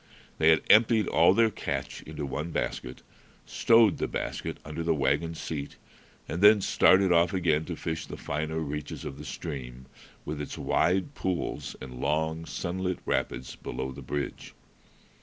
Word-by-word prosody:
They 80 Hz, -, +5 dB
had 80 Hz, -2 st, +4 dB
emptied 110 Hz, -1 st, +5 dB
all 85 Hz, +4 st, +5 dB
their 115 Hz, 0 st, +4 dB
catch -, -, -4 dB
into 75 Hz, -2 st, -6 dB
one 75 Hz, +5 st, -4 dB
basket, -, -, -4 dB, 0.4 s
stowed 115 Hz, -4 st, +4 dB
the -, -, 0 dB
basket -, -, -4 dB
under 75 Hz, +2 st, -5 dB
the 85 Hz, -1 st, +1 dB
wagon 75 Hz, +4 st, 0 dB
seat, 75 Hz, -3 st, -5 dB, 0.5 s
then 105 Hz, +5 st, +5 dB
started 95 Hz, 0 st, +4 dB
off 85 Hz, +2 st, +3 dB
again 80 Hz, -4 st, +1 dB
to 85 Hz, -, -4 dB
fish 80 Hz, 0 st, -4 dB
the -, -, -7 dB
finer 75 Hz, +2 st, -3 dB
reaches 75 Hz, -1 st, -5 dB
of 70 Hz, -, -6 dB
the -, -, -8 dB
stream, 65 Hz, -5 st, -6 dB, 0.4 s
with 75 Hz, 0 st, -4 dB
its 75 Hz, -, -6 dB
wide 95 Hz, +10 st, +1 dB
pools 95 Hz, -8 st, -3 dB
and 65 Hz, -1 st, -8 dB
long, 80 Hz, +3 st, 0 dB
sunlit 90 Hz, +1 st, -3 dB
rapids, 60 Hz, +2 st, -2 dB
below 65 Hz, +1 st, -5 dB
the -, -, -9 dB
bridge. 75 Hz, -1 st, -5 dB
80 Hz, 155 wpm, -28 LUFS, 75-90 Hz, 0.5 s, They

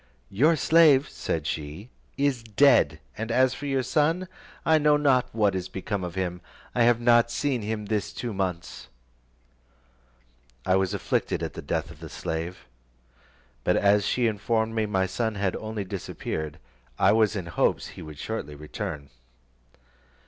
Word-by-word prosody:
"Your 150 Hz, +11 st, +4 dB
slave," 155 Hz, -4 st, +5 dB
said 80 Hz, -2 st, -3 dB
she, 80 Hz, +9 st, -5 dB, 0.3 s
"is 140 Hz, -4 st, +1 dB
dead; 110 Hz, -, +4 dB, 0.2 s
and 110 Hz, +2 st, -4 dB
as 130 Hz, +2 st, +3 dB
for 145 Hz, -, -6 dB
your 135 Hz, -2 st, 0 dB
son, 160 Hz, +7 st, +1 dB, 0.4 s
I 160 Hz, -1 st, +5 dB
know 150 Hz, 0 st, +4 dB
not 135 Hz, -4 st, +2 dB
what 105 Hz, -3 st, +2 dB
is 95 Hz, -1 st, -3 dB
become 95 Hz, 0 st, -4 dB
of 90 Hz, 0 st, -5 dB
him, 90 Hz, -2 st, -3 dB, 0.3 s
I 120 Hz, -, +1 dB
have 120 Hz, -1 st, +4 dB
not 120 Hz, 0 st, +4 dB
seen 130 Hz, 0 st, -1 dB
him 105 Hz, 0 st, -3 dB
this 105 Hz, -1 st, -2 dB
two 120 Hz, -3 st, -5 dB
months." 90 Hz, -3 st, -4 dB, 1.8 s
I 95 Hz, -, +3 dB
was 95 Hz, -1 st, +1 dB
afflicted -, -, -1 dB
at -, -, -4 dB
the -, -, -7 dB
death -, -, -3 dB
of -, -, -14 dB
the -, -, -9 dB
slave, 85 Hz, +2 st, -5 dB, 1.0 s
but -, -, +2 dB
as 100 Hz, 0 st, +4 dB
she 120 Hz, +4 st, +1 dB
informed 110 Hz, +1 st, 0 dB
me 110 Hz, -1 st, 0 dB
my 95 Hz, -2 st, +1 dB
son 110 Hz, +3 st, -2 dB
had 100 Hz, -2 st, -1 dB
only 110 Hz, -1 st, -4 dB
disappeared, 85 Hz, -5 st, -5 dB, 0.4 s
I -, -, +5 dB
was 110 Hz, -1 st, +3 dB
in 95 Hz, -4 st, -3 dB
hopes 85 Hz, -, 0 dB
he -, -, -11 dB
would 75 Hz, -1 st, -9 dB
shortly 95 Hz, -6 st, -5 dB
return. 70 Hz, -1 st, -6 dB
110 Hz, 160 wpm, -26 LUFS, 95-125 Hz, 1.8 s, slave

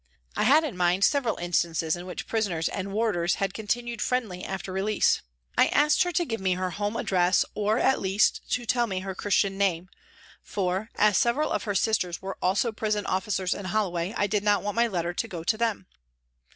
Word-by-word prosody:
I -, -, +1 dB
had 295 Hz, +7 st, +6 dB
in 290 Hz, -10 st, -4 dB
mind 180 Hz, +1 st, +2 dB
several 260 Hz, -1 st, +2 dB
instances 170 Hz, -2 st, 0 dB
in 175 Hz, +1 st, -8 dB
which 180 Hz, -, -6 dB
prisoners 195 Hz, -8 st, -1 dB
and 195 Hz, 0 st, -4 dB
warders 195 Hz, -5 st, +1 dB
had 195 Hz, -1 st, -2 dB
continued 235 Hz, +2 st, -3 dB
friendly 220 Hz, -8 st, -1 dB
after 190 Hz, 0 st, -5 dB
release. 200 Hz, +3 st, +2 dB, 0.3 s
I -, -, +5 dB
asked 300 Hz, +1 st, +3 dB
her 355 Hz, -, +2 dB
to 345 Hz, +2 st, +1 dB
give 225 Hz, -8 st, -4 dB
me 190 Hz, -1 st, +2 dB
her 185 Hz, 0 st, -2 dB
home 205 Hz, +3 st, -3 dB
address 180 Hz, -1 st, +2 dB
or, 215 Hz, +1 st, +1 dB
at 265 Hz, +1 st, +2 dB
least, 195 Hz, +2 st, +2 dB
to 245 Hz, -1 st, -1 dB
tell 240 Hz, 0 st, +1 dB
me 190 Hz, -3 st, -3 dB
her 190 Hz, 0 st, -5 dB
Christian 195 Hz, 0 st, 0 dB
name, 185 Hz, -2 st, 0 dB, 0.5 s
for, 190 Hz, +2 st, -2 dB
as 210 Hz, -1 st, +4 dB
several 270 Hz, +6 st, +1 dB
of -, -, -1 dB
her 205 Hz, -2 st, -2 dB
sisters 195 Hz, -4 st, 0 dB
were 195 Hz, 0 st, -7 dB
also 205 Hz, +7 st, +1 dB
prison 215 Hz, -1 st, -2 dB
officers 190 Hz, -1 st, -1 dB
in 200 Hz, -, -7 dB
Holloway, 185 Hz, -3 st, -1 dB
I -, -, +2 dB
did 205 Hz, 0 st, 0 dB
not 205 Hz, -1 st, +2 dB
want 205 Hz, 0 st, -2 dB
my 235 Hz, +2 st, +2 dB
letter 175 Hz, -4 st, -2 dB
to 230 Hz, -, -2 dB
go 175 Hz, -6 st, -6 dB
to 195 Hz, -, +1 dB
them. 225 Hz, -4 st, -1 dB
200 Hz, 205 wpm, -26 LUFS, 185-225 Hz, 0.5 s, had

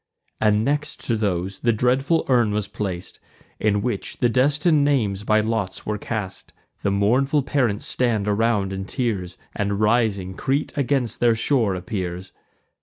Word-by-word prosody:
And 105 Hz, 0 st, +3 dB
next 150 Hz, +2 st, -1 dB
to 115 Hz, -, +1 dB
those 95 Hz, -3 st, -2 dB
the 120 Hz, -, +2 dB
dreadful 130 Hz, +8 st, +1 dB
urn 120 Hz, -5 st, +3 dB
was 105 Hz, -1 st, -1 dB
plac'd, 95 Hz, -4 st, -5 dB, 0.4 s
In 105 Hz, -1 st, +1 dB
which 115 Hz, -5 st, -3 dB
the 120 Hz, -, +2 dB
destin'd 145 Hz, +5 st, +3 dB
names 110 Hz, -9 st, +1 dB
by 110 Hz, 0 st, +3 dB
lots 110 Hz, -3 st, -2 dB
were 105 Hz, -1 st, -2 dB
cast: 105 Hz, -4 st, -5 dB, 0.3 s
The -, -, 0 dB
mournful 125 Hz, +9 st, +2 dB
parents 125 Hz, -7 st, 0 dB
stand 115 Hz, -5 st, 0 dB
around 105 Hz, -2 st, +1 dB
in 95 Hz, 0 st, -4 dB
tears, 95 Hz, -6 st, -2 dB, 0.2 s
And 100 Hz, -1 st, -1 dB
rising 105 Hz, -4 st, +1 dB
Crete 135 Hz, +9 st, -1 dB
against 135 Hz, -5 st, 0 dB
their 120 Hz, -1 st, +4 dB
shore 115 Hz, -4 st, +1 dB
appears. 90 Hz, -2 st, -5 dB
110 Hz, 150 wpm, -23 LUFS, 100-125 Hz, 0.4 s, their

